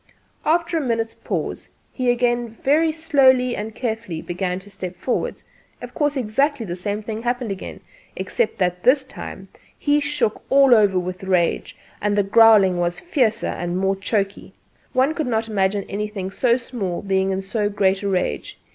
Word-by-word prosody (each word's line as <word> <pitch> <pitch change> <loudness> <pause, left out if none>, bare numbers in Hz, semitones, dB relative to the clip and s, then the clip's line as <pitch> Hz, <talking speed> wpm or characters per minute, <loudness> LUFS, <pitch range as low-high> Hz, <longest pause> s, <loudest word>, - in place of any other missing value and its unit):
After 335 +1 +2
a - - -2
minute's 230 -4 -1
pause, - - -4 0.2
he 255 -2 0
again 240 -1 0
very 315 +4 +3
slowly 270 -6 +3
and 215 +1 -5
carefully 225 -8 -3
began 180 +2 -3
to 200 - -15
step 185 -2 -6
forward; 245 +7 -2 0.4
of - - -9
course 295 -2 0
exactly 260 +2 0
the 175 -3 -4
same 205 +4 -3
thing 220 +1 -5
happened 245 -2 -2
again, 195 - -7 0.3
except 480 - -1
that 180 -2 0
this 265 +5 +4
time 260 - -9 0.3
he 290 0 +2
shook 285 -7 -1
all 275 -2 +6
over 205 -4 +4
with 180 +1 -3
rage, 180 -3 0 0.2
and 205 0 0
the 205 - +4
growling 200 -3 +6
was 175 0 -1
fiercer 245 - 0
and 175 +1 -3
more 195 +1 +1
choky. 195 0 -2 0.4
One 265 +4 +3
could 310 -4 -2
not 225 -2 0
imagine 200 -1 0
anything 200 -2 -4
so 240 +3 +2
small 215 -8 -4
being 190 -1 +1
in 190 0 -2
so 205 +1 -1
great 195 -1 +1
a 200 - -1
rage. 180 - -2
215 Hz, 170 wpm, -22 LUFS, 190-255 Hz, 0.4 s, all